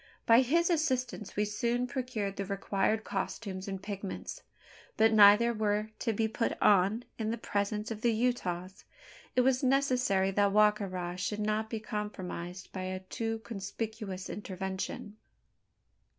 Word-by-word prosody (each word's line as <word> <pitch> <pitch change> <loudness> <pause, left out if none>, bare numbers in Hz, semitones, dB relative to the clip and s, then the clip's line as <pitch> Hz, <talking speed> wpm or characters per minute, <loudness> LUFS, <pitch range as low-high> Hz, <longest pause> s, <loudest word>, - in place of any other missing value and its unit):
By 230 +2 +7
his 335 +7 +2
assistance 255 - -1
we 210 - +2
soon 235 +4 0
procured 245 -6 -3
the 195 - -2
required 200 +2 0
costumes 190 -4 -4
and 195 -1 -4
pigments; 200 -1 -6 0.6
but 220 +1 +5
neither 215 +3 +7
were 210 -1 0
to 230 - 0
be 220 +1 +1
"put 225 +1 -2
on" 205 +4 +4 0.2
in 220 -1 -1
the 230 - -1
presence 210 0 -2
of 215 -1 -5
the 235 - +3
Utahs. 195 -6 -1 0.5
It 250 - +5
was 255 0 +3
necessary 255 -8 +2
that 200 +1 +3
Wa 210 0 +7
ka 210 -1 -5
ra 180 -2 -4
should 195 +3 -2
not 215 +1 0
be 225 - -3
compromised 190 -4 -5
by 185 - -5
a 185 0 -4
too 225 +4 -3
conspicuous 205 -2 -5
"intervention." 190 +1 -5
210 Hz, 150 wpm, -31 LUFS, 195-230 Hz, 0.6 s, By